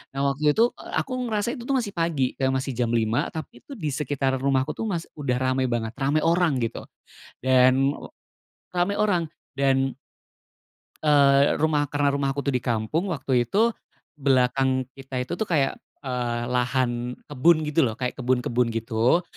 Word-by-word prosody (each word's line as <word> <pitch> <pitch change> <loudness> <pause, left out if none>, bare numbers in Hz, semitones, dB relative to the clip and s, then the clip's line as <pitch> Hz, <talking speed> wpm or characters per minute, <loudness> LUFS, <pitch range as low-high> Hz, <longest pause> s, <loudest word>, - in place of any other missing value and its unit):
Nah, 135 - -1
waktu 150 +2 +1
itu, 235 +2 +4
eee, - - -12
aku 270 - -13 0.2
ngerasa 215 -1 -1
itu 250 -5 -7
tuh, 275 - +1
masih 235 -6 -1
pagi, 165 -7 0
masih 130 0 0
jam 120 - +2
5, 115 0 +1
tapi 155 -6 -8
itu 280 - -11
di 155 - -3
sekitar 135 -1 -1
rumahku 130 0 +1
tuh 225 - -4
mas 175 -5 -2 0.2
udah 135 -4 0
rame 130 +1 0
banget, 115 -2 -2
rame 145 +3 +1
orang, 165 -6 +2
gitu. 115 0 -4 0.5
Dan, 130 +1 +4
ee, - - -10 0.7
rame 175 +3 +2
orang 195 -5 +2 0.3
dan 135 -1 +1 1.1
eee, 140 -2 +5
rumah, 150 -1 +1
karena 145 0 +1
rumah 140 -1 -1
aku 140 - -3
tuh 140 - 0
di 125 - +1
kampung, 120 - -1
waktu 130 -7 0
itu, 225 - +3 0.5
belakang 130 -1 +2 0.2
kita 130 -1 -4
itu 125 - -11
tuh 220 - -1
kayak, 145 -6 +1 0.2
eee, 120 -3 -2
lahan 125 -1 0
kebun 155 +3 +3
gitu 150 -2 +2
loh, 110 - -4
kayak 125 +2 -4
kebun-kebun 125 -1 +1
gitu. 115 +7 +1
135 Hz, 165 wpm, -25 LUFS, 125-155 Hz, 1.1 s, eee